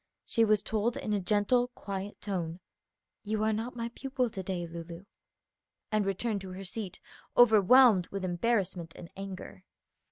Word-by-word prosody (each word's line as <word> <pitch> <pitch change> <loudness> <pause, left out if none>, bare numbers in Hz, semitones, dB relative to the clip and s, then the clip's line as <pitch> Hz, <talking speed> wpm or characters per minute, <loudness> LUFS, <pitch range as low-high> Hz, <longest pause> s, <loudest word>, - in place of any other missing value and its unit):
She 230 - +2
was 215 -2 +3
told 220 +2 0
in 210 - -2
a 205 - +2
gentle, 210 +6 +2
quiet 200 0 -5
tone, 175 -4 -3 0.6
"You 215 0 -1
are 220 0 +2
not 230 +4 -3
my 230 -1 -3
pupil, 255 -1 -2
to 190 - -5
day, 185 -2 -3
Lulu," 170 +2 -8 0.9
and 215 -2 +1
returned 200 +1 -1
to 190 -1 -7
her 190 +1 -7
seat 195 0 -5 0.4
overwhelmed 220 -3 +7
with 195 -1 -4
embarrassment 180 -3 -1
and 170 - -10
anger. 190 -1 -8
200 Hz, 155 wpm, -30 LUFS, 185-225 Hz, 0.9 s, overwhelmed